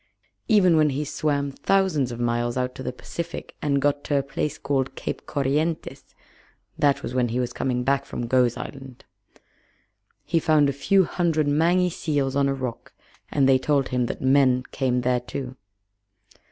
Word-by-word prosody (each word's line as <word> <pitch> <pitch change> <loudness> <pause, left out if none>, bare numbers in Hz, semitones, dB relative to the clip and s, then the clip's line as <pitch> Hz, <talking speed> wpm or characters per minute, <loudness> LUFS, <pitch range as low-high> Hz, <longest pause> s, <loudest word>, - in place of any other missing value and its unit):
Even 185 -7 +5
when 155 -1 +4
he 145 +2 -2
swam 145 -2 -1
thousands 155 -5 +1
of 120 - -6
miles 120 0 -1
out 125 0 -2
of - - -5
the - - -2
Pacific 170 +6 -7
and 140 -2 +1
got 145 +1 0
to 145 - +1
a 140 - +1
place 145 +2 -3
called 135 -1 -1
Cape - - -5
Corrientes 150 +4 -2 0.6
(that 145 -1 +2
was 120 - -5
when 125 -1 +1
he 120 +2 -2
was 125 -1 -2
coming 125 -1 -1
back 140 +1 +1
from 120 - -5
Gough's 125 0 +2
Island), 135 -2 -9 1.2
he 165 - +1
found 150 -2 +3
a - - -1
few 190 +8 +3
hundred 165 -4 0
mangy 175 +5 +2
seals 145 -5 -1
on 140 -1 +2
a - - +1
rock 125 -3 -6 0.4
and 140 -2 +2
they 135 -1 +5
told 140 0 +1
him 125 -1 0
that - - -5
men 130 -1 +4
came 125 -2 0
there 125 0 +1
too. 125 +1 -6
140 Hz, 175 wpm, -24 LUFS, 125-150 Hz, 1.2 s, Even